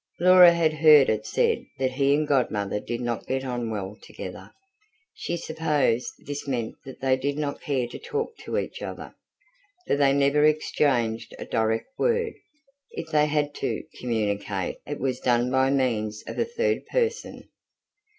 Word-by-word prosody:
Laura 180 Hz, 0 st, +8 dB
had 165 Hz, -2 st, +2 dB
heard 155 Hz, -3 st, +6 dB
it 110 Hz, 0 st, -1 dB
said -, -, +1 dB
that 130 Hz, -1 st, 0 dB
he 140 Hz, +1 st, +2 dB
and 150 Hz, 0 st, 0 dB
Godmother 105 Hz, -8 st, 0 dB
did 120 Hz, +3 st, -5 dB
not 120 Hz, -1 st, -3 dB
get 130 Hz, 0 st, -2 dB
on 120 Hz, -2 st, -3 dB
well 100 Hz, -2 st, -4 dB
together; -, -, -9 dB, 0.6 s
she 175 Hz, -, -4 dB
supposed 150 Hz, -7 st, 0 dB
this 145 Hz, 0 st, -5 dB
meant 120 Hz, -4 st, -2 dB
that 135 Hz, -, -11 dB
they 130 Hz, -1 st, +3 dB
did 140 Hz, +2 st, -2 dB
not 145 Hz, -2 st, -3 dB
care 135 Hz, -4 st, -1 dB
to -, -, -9 dB
talk 455 Hz, 0 st, -3 dB
to -, -, -4 dB
each -, -, -4 dB
other, -, -, -7 dB, 0.7 s
for -, -, +1 dB
they 140 Hz, -1 st, +4 dB
never 140 Hz, +1 st, +3 dB
exchanged 140 Hz, -6 st, +1 dB
a -, -, -7 dB
direct 110 Hz, 0 st, 0 dB
word: 465 Hz, -1 st, +1 dB, 0.6 s
if 160 Hz, -, -7 dB
they 150 Hz, -1 st, +4 dB
had 150 Hz, -1 st, 0 dB
to 135 Hz, -, -3 dB, 0.2 s
communicate, 105 Hz, -5 st, -2 dB
it 145 Hz, -, -4 dB
was 130 Hz, -2 st, -1 dB
done 120 Hz, 0 st, +1 dB
by 130 Hz, 0 st, +3 dB
means 110 Hz, -6 st, 0 dB
of -, -, -6 dB
a -, -, +2 dB
third 470 Hz, 0 st, -1 dB
person. 470 Hz, -1 st, -2 dB
135 Hz, 165 wpm, -25 LUFS, 120-150 Hz, 0.7 s, Laura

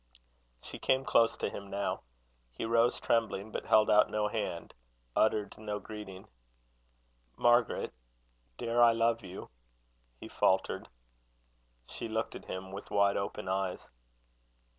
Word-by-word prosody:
She -, -, -8 dB
came 130 Hz, 0 st, +1 dB
close 115 Hz, 0 st, +3 dB
to -, -, -1 dB
him 100 Hz, 0 st, -8 dB
now. 100 Hz, 0 st, -2 dB, 0.5 s
He -, -, -4 dB
rose, 115 Hz, +1 st, +3 dB
trembling, 110 Hz, -2 st, 0 dB
but -, -, -5 dB
held 110 Hz, 0 st, +5 dB
out 105 Hz, 0 st, +5 dB
no 105 Hz, 0 st, 0 dB
hand, 100 Hz, -7 st, -4 dB, 0.4 s
uttered 105 Hz, -2 st, +2 dB
no 105 Hz, -1 st, -3 dB
greeting. 105 Hz, -2 st, -9 dB, 1.1 s
"Margaret, 120 Hz, 0 st, +3 dB, 0.6 s
dare 120 Hz, +1 st, +1 dB
I 120 Hz, -1 st, +7 dB
love 115 Hz, 0 st, +1 dB
you?" 95 Hz, 0 st, -9 dB, 0.7 s
he -, -, -8 dB
faltered. -, -, +1 dB, 1.0 s
She -, -, -6 dB
looked 110 Hz, 0 st, -2 dB
at -, -, -9 dB
him 95 Hz, 0 st, -6 dB
with 100 Hz, +2 st, -8 dB
wide 100 Hz, -1 st, +3 dB
open 100 Hz, -1 st, -3 dB
eyes. 95 Hz, -1 st, -2 dB
105 Hz, 130 wpm, -31 LUFS, 100-115 Hz, 1.1 s, I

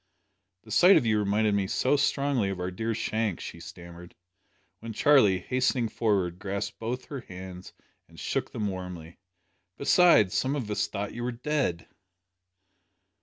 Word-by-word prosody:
"The 110 Hz, -, -14 dB
sight 180 Hz, -, +7 dB
of -, -, +1 dB
you 110 Hz, -1 st, +2 dB
reminded 105 Hz, +1 st, +1 dB
me 100 Hz, -1 st, 0 dB
so 130 Hz, +8 st, +1 dB
strongly 140 Hz, -6 st, +1 dB
of 95 Hz, -2 st, -4 dB
our 90 Hz, +1 st, -3 dB
dear 110 Hz, +4 st, -3 dB
Shank!" 110 Hz, -3 st, -2 dB
she -, -, -8 dB
stammered, 85 Hz, 0 st, -12 dB, 0.6 s
when 115 Hz, 0 st, -7 dB
Charlie, 110 Hz, -7 st, +4 dB
hastening 125 Hz, +2 st, 0 dB
forward, 95 Hz, -6 st, 0 dB
grasped 100 Hz, +1 st, -4 dB
both 120 Hz, +3 st, -4 dB
her 140 Hz, -, -6 dB
hands 95 Hz, -3 st, -10 dB, 0.4 s
and -, -, -16 dB
shook -, -, -2 dB
them 105 Hz, -, -2 dB
warmly. 90 Hz, -4 st, -7 dB, 0.6 s
"Besides 140 Hz, -, +5 dB
some 135 Hz, +2 st, 0 dB
of 120 Hz, -7 st, -4 dB
us 105 Hz, -, 0 dB
thought 105 Hz, -1 st, -5 dB
you 120 Hz, -, -6 dB
were 125 Hz, -, -1 dB
dead." 125 Hz, -, -2 dB
105 Hz, 155 wpm, -27 LUFS, 95-125 Hz, 0.6 s, sight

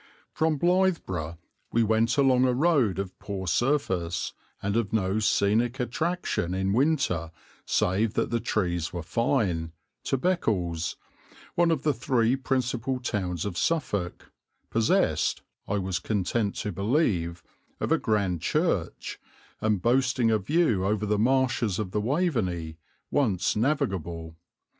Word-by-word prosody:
From 160 Hz, -1 st, +1 dB
Blythburgh 165 Hz, -, +1 dB, 0.3 s
we 115 Hz, -, +3 dB
went 115 Hz, +3 st, +2 dB
along 130 Hz, -2 st, +4 dB
a 125 Hz, -1 st, +2 dB
road 135 Hz, -, +3 dB
of 95 Hz, -1 st, -5 dB
poor 95 Hz, -2 st, -5 dB
surface, 95 Hz, -, 0 dB, 0.3 s
and 100 Hz, +1 st, -2 dB
of 115 Hz, -3 st, 0 dB
no 100 Hz, -1 st, +1 dB
scenic 110 Hz, +4 st, +2 dB
attraction 125 Hz, -, -1 dB
in 95 Hz, +1 st, 0 dB
winter 130 Hz, -, +1 dB, 0.4 s
save 105 Hz, +4 st, +1 dB
that -, -, 0 dB
the 120 Hz, -, +1 dB
trees 90 Hz, -7 st, -1 dB
were 85 Hz, -2 st, -5 dB
fine, 90 Hz, -, 0 dB, 0.3 s
to 135 Hz, -, +1 dB
Beccles, 100 Hz, -, 0 dB, 0.6 s
one 170 Hz, 0 st, +3 dB
of 155 Hz, -4 st, 0 dB
the 150 Hz, -, +2 dB
three 120 Hz, 0 st, +1 dB
principal 130 Hz, -1 st, -1 dB
towns 95 Hz, -8 st, -2 dB
of 95 Hz, -4 st, -3 dB
Suffolk, 100 Hz, -, -1 dB, 0.4 s
possessed, 115 Hz, -1 st, +2 dB, 0.2 s
I 100 Hz, -, 0 dB
was 95 Hz, -2 st, -1 dB
content 100 Hz, +2 st, -1 dB
to 105 Hz, -, -3 dB
believe, 100 Hz, -, 0 dB, 0.4 s
of -, -, -2 dB
a -, -, +4 dB
grand 100 Hz, -6 st, 0 dB
church, -, -, -1 dB, 0.4 s
and 105 Hz, -4 st, 0 dB
boasting 125 Hz, -1 st, +3 dB
a 110 Hz, -, +3 dB
view 115 Hz, -, +2 dB
over 105 Hz, +2 st, 0 dB
the 105 Hz, 0 st, +1 dB
marshes 130 Hz, -4 st, +2 dB
of 105 Hz, -4 st, -3 dB
the 105 Hz, -, 0 dB
Waveney, 105 Hz, -, -1 dB, 0.3 s
once 105 Hz, -11 st, +1 dB
navigable. 95 Hz, -, -1 dB
110 Hz, 135 wpm, -27 LUFS, 95-130 Hz, 0.6 s, along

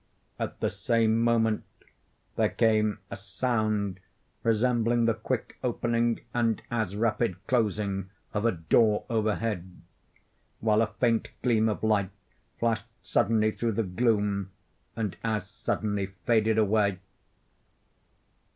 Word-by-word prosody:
At -, -, -4 dB
the -, -, +1 dB
same 115 Hz, -1 st, +2 dB
moment 115 Hz, -2 st, +2 dB, 0.7 s
there -, -, +2 dB
came 110 Hz, -2 st, +2 dB
a -, -, -3 dB
sound 105 Hz, -2 st, -1 dB, 0.4 s
resembling 115 Hz, +1 st, +2 dB
the 115 Hz, -, +3 dB
quick 115 Hz, +2 st, -4 dB
opening, 120 Hz, -1 st, 0 dB
and 115 Hz, -2 st, +1 dB
as 110 Hz, -5 st, -1 dB
rapid 110 Hz, -2 st, +1 dB
closing 105 Hz, -5 st, 0 dB, 0.2 s
of 105 Hz, -, -1 dB
a 115 Hz, -, +4 dB
door 105 Hz, +5 st, +2 dB
overhead, 110 Hz, -4 st, -1 dB, 0.8 s
while 110 Hz, 0 st, +3 dB
a 115 Hz, -, +2 dB
faint 115 Hz, 0 st, +1 dB, 0.2 s
gleam 110 Hz, -3 st, +3 dB
of 105 Hz, -, -3 dB
light 105 Hz, -3 st, +2 dB, 0.5 s
flashed 115 Hz, 0 st, 0 dB, 0.2 s
suddenly 110 Hz, 0 st, +2 dB
through 115 Hz, +1 st, -1 dB
the 115 Hz, -, 0 dB
gloom, 100 Hz, -1 st, 0 dB, 0.5 s
and 110 Hz, -4 st, -3 dB
as 110 Hz, -4 st, -1 dB
suddenly 105 Hz, -1 st, -2 dB, 0.2 s
faded 110 Hz, -2 st, +3 dB
away. 105 Hz, -2 st, +2 dB
110 Hz, 115 wpm, -28 LUFS, 105-115 Hz, 0.8 s, a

